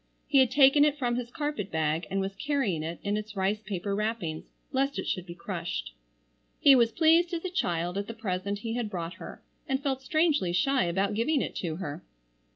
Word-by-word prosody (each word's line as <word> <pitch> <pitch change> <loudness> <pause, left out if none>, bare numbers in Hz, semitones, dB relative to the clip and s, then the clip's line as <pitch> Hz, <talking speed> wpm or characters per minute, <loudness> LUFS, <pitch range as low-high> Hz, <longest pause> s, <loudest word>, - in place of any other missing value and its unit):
He 280 - +4
had 260 -2 +5
taken 280 +1 +6
it 295 0 +2
from 245 -4 0
his 245 -1 -3
carpet 290 - -3
bag 160 +1 -1
and 195 - -1
was 195 0 -3
carrying 265 - 0
it 165 +2 -5
in 205 0 0
its 215 0 -6
rice 200 +2 0
paper 200 -1 -3
wrappings 210 -6 -2 0.3
lest 275 0 0
it - - -3
should 185 0 -3
be 170 - -8
crushed. - - -4 0.7
He 280 - +8
was 235 -2 +4
pleased 335 +4 +4
as 330 - -5
a 370 - -2
child 175 - -1
at 200 - -4
the 230 - -6
present 200 -2 -2
he 225 - -2
had 235 -3 -2
brought 175 -3 -4
her, - - -9 0.2
and 270 -1 -1
felt 270 -2 -1
strangely 300 - +1
shy 265 +7 +2
about 195 +4 0
giving 245 +8 +1
it - - -3
to 165 -4 -3
her. 160 -5 -6
215 Hz, 210 wpm, -28 LUFS, 180-275 Hz, 0.7 s, He